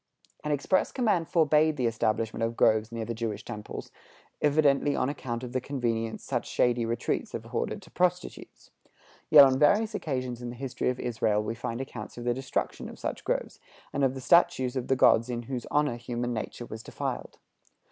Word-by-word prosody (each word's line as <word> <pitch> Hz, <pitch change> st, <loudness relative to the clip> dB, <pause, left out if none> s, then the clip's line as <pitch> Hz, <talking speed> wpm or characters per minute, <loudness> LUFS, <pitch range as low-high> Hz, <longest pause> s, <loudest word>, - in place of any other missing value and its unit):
An 150 Hz, -, -2 dB
express 150 Hz, +6 st, +1 dB
command 205 Hz, -10 st, +1 dB
forbade 155 Hz, -1 st, +3 dB
the 125 Hz, -, 0 dB
establishment 115 Hz, 0 st, 0 dB
of 115 Hz, +1 st, -1 dB
groves 110 Hz, 0 st, +3 dB
near 115 Hz, -1 st, -4 dB
the 115 Hz, -, -3 dB
Jewish 110 Hz, -2 st, -4 dB
temples, 105 Hz, 0 st, -7 dB, 0.5 s
evidently 145 Hz, -1 st, +3 dB
on 130 Hz, -, +1 dB
account 120 Hz, -4 st, -4 dB
of 125 Hz, -, -6 dB
the 130 Hz, -, 0 dB
convenience 115 Hz, -4 st, -2 dB
such -, -, -2 dB
shady 120 Hz, -1 st, +2 dB
retreats 115 Hz, 0 st, -2 dB
afforded -, -, -3 dB
to -, -, -17 dB
prostitutes. 180 Hz, 0 st, -2 dB, 0.6 s
Yet 145 Hz, -2 st, +10 dB
on 130 Hz, 0 st, +2 dB
various 210 Hz, +9 st, +4 dB
occasions 130 Hz, -, -3 dB
in 120 Hz, -, -5 dB
the 120 Hz, -, -7 dB
history 130 Hz, 0 st, -2 dB
of 125 Hz, -, -2 dB
Israel 110 Hz, -3 st, 0 dB
we 105 Hz, -, -3 dB
find 115 Hz, +1 st, -4 dB
accounts 120 Hz, -5 st, -8 dB
of 120 Hz, -, -6 dB
the 120 Hz, 0 st, +1 dB
destruction 130 Hz, +2 st, -3 dB
of -, -, -11 dB
such -, -, -4 dB
groves, -, -, -2 dB, 0.3 s
and 140 Hz, -, 0 dB
of 135 Hz, 0 st, +2 dB
the 130 Hz, -, -6 dB
statues 130 Hz, -4 st, +3 dB
of 130 Hz, -2 st, -2 dB
the 135 Hz, -, +3 dB
gods 120 Hz, -2 st, +4 dB
in 120 Hz, -1 st, -3 dB
whose 125 Hz, 0 st, -5 dB
honor 145 Hz, -5 st, +1 dB
human 120 Hz, 0 st, -3 dB
nature 115 Hz, +2 st, -5 dB
was 110 Hz, -1 st, -8 dB
defiled. -, -, -5 dB
125 Hz, 190 wpm, -28 LUFS, 115-145 Hz, 0.6 s, Yet